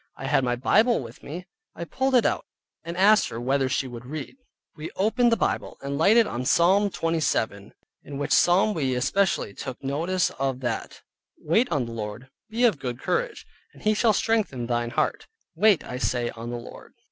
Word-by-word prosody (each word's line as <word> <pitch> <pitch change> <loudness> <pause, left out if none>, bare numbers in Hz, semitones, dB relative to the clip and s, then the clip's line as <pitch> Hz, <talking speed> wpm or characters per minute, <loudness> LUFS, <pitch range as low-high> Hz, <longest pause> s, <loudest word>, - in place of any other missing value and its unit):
I - - -7
had - - +2
my 120 -1 +1
Bible 220 - +3
with 120 -2 -10
me, 170 +5 -7 0.3
I - - -5
pulled 265 +9 0
it 245 - +4
out, - - 0 0.4
and 170 +1 -6
asked 210 +3 +5
her 115 - -6
whether 135 +2 +1
she 135 0 -1
would 120 -1 -9
read. 150 - -6 0.4
We 155 +1 -6
opened 235 +5 +2
the 230 - +3
Bible - - -2
and 140 0 -3
lighted 215 +10 +5
on 125 - -4
Psalm 190 +9 +3
27, 155 - -1 0.3
in 140 - -8
which 145 - -3
Psalm 190 +5 +4
we 135 -7 -1
especially 150 - 0
took 130 +5 -7
notice 165 +7 0
of 135 -2 -1
that, 120 -3 -2 0.5
ver. - - -29
ult., - - -16
"Wait 230 +6 +3
on 140 -6 0
the 115 - -8
Lord, 115 +3 -6 0.2
Be 230 +3 -1
of 215 -12 +4
good 125 -2 -4
courage, - - -2 0.3
and - - -16
he 215 - +3
shall 220 +1 +3
strengthen 205 - 0
thine 120 0 -1
Heart, - - -1 0.3
wait 195 +1 +4
I 125 - -6
say 120 -2 -1
on 115 +1 -8
the 120 - -4
Lord." 120 - -12
145 Hz, 200 wpm, -25 LUFS, 125-205 Hz, 0.5 s, asked